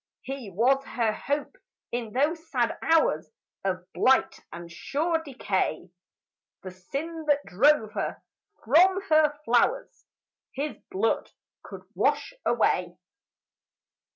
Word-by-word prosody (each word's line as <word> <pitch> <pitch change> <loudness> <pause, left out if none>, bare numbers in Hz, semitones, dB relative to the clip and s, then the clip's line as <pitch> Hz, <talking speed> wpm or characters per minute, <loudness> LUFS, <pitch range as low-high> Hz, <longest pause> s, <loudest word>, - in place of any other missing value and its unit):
He 265 -5 -6
was 250 +8 +2
her 230 -5 -1
hope 290 - -3 0.3
in 235 -3 -3
those 315 +7 0
sad 245 -3 0
hours 325 0 +2 0.3
Of 185 -2 -2
blight 265 0 +3
and 170 0 -9
sure 315 - -1
decay; 195 - -2 0.7
The 185 - -7
sin 305 - -6
that 290 -1 +2
drove 225 +2 +3
her - - -3 0.5
from 360 - +5
her 310 -1 +4
flowers 350 - +1 0.5
His 290 +2 -3
blood 220 +4 0 0.3
could - - -10
wash - - 0
away. - - +1
270 Hz, 110 wpm, -27 LUFS, 215-310 Hz, 0.7 s, from